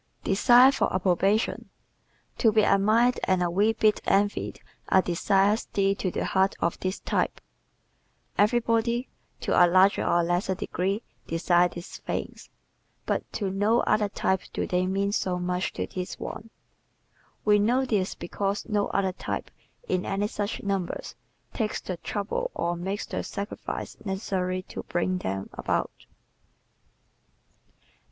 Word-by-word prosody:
Desire 245 Hz, +6 st, +6 dB
for 275 Hz, -, 0 dB
Approbation 190 Hz, +4 st, +1 dB, 0.7 s
¶ -, -, -35 dB
To 225 Hz, -, +5 dB
be 215 Hz, 0 st, +4 dB
admired 215 Hz, +6 st, +3 dB
and 185 Hz, -1 st, +2 dB
a 175 Hz, -, 0 dB
wee 205 Hz, +5 st, +3 dB
bit 215 Hz, -1 st, +2 dB
envied 205 Hz, +1 st, +1 dB, 0.3 s
are 190 Hz, -, +5 dB
desires 195 Hz, +4 st, +2 dB
dear 195 Hz, 0 st, +2 dB
to 195 Hz, -1 st, -2 dB
the -, -, -2 dB
heart 190 Hz, +1 st, +2 dB
of 170 Hz, -, -1 dB
this 185 Hz, +1 st, -2 dB
type. -, -, -1 dB, 1.0 s
Everybody, 235 Hz, +2 st, +2 dB, 0.3 s
to -, -, -1 dB
a 175 Hz, -1 st, +6 dB
greater 185 Hz, +3 st, +4 dB
or 175 Hz, -, +2 dB
lesser 175 Hz, +2 st, 0 dB
degree, 195 Hz, +2 st, -2 dB, 0.2 s
desires 175 Hz, +1 st, +2 dB
these 175 Hz, +1 st, -8 dB
things, -, -, -5 dB, 0.6 s
but -, -, -2 dB
to 200 Hz, -3 st, -2 dB
no 205 Hz, +4 st, +2 dB
other 210 Hz, -1 st, +2 dB
type 190 Hz, -1 st, 0 dB
do -, -, -1 dB
they 180 Hz, 0 st, 0 dB
mean 195 Hz, +1 st, 0 dB
so 185 Hz, -3 st, 0 dB
much 180 Hz, +1 st, -1 dB
as -, -, -3 dB
to -, -, -3 dB
this 180 Hz, -1 st, -4 dB
one. 225 Hz, -, -7 dB, 1.0 s
We 210 Hz, -1 st, +5 dB
know 245 Hz, +6 st, +2 dB
this 200 Hz, -6 st, 0 dB
because 200 Hz, +3 st, -3 dB
no 205 Hz, -2 st, +1 dB
other 190 Hz, -2 st, 0 dB
type, -, -, -5 dB, 0.4 s
in 185 Hz, -, 0 dB
any 195 Hz, +1 st, -1 dB
such 205 Hz, 0 st, -3 dB
numbers, 195 Hz, -3 st, -3 dB, 0.4 s
takes 220 Hz, -3 st, -1 dB
the 180 Hz, -, -5 dB
trouble 215 Hz, -, -3 dB
or 170 Hz, 0 st, -1 dB
makes 190 Hz, +4 st, -3 dB
the -, -, -3 dB
sacrifices 200 Hz, +1 st, -6 dB
necessary 190 Hz, -2 st, -2 dB
to -, -, -7 dB
bring 180 Hz, +1 st, -1 dB
them 95 Hz, -, -4 dB
about. -, -, -3 dB
195 Hz, 145 wpm, -27 LUFS, 185-210 Hz, 1.0 s, Desire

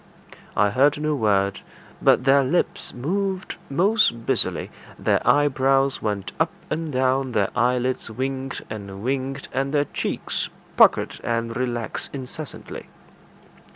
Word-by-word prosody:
I 105 Hz, 0 st, +4 dB
heard 140 Hz, +5 st, +3 dB
no 155 Hz, 0 st, 0 dB
word, 100 Hz, -6 st, +1 dB, 0.4 s
but -, -, +4 dB
their 135 Hz, +1 st, +5 dB
lips 140 Hz, +7 st, 0 dB
moved 190 Hz, +8 st, -2 dB
most 175 Hz, -, +2 dB
busily; -, -, +1 dB, 0.3 s
their -, -, +1 dB
eyebrows 135 Hz, -1 st, +3 dB
went 105 Hz, -3 st, -2 dB
up -, -, +3 dB, 0.2 s
and 160 Hz, -1 st, -2 dB
down; 130 Hz, 0 st, +1 dB
their 100 Hz, -3 st, +1 dB
eyelids 125 Hz, +1 st, +1 dB
winked 135 Hz, +3 st, -4 dB
and 100 Hz, -2 st, -7 dB
winked, 135 Hz, +2 st, -2 dB
and 135 Hz, +1 st, 0 dB
their 145 Hz, 0 st, +3 dB
cheeks -, -, -3 dB, 0.3 s
puckered -, -, +4 dB
and 115 Hz, -1 st, -1 dB
relaxed 120 Hz, -2 st, -3 dB
incessantly. 140 Hz, +2 st, -7 dB
130 Hz, 120 wpm, -23 LUFS, 115-140 Hz, 0.4 s, their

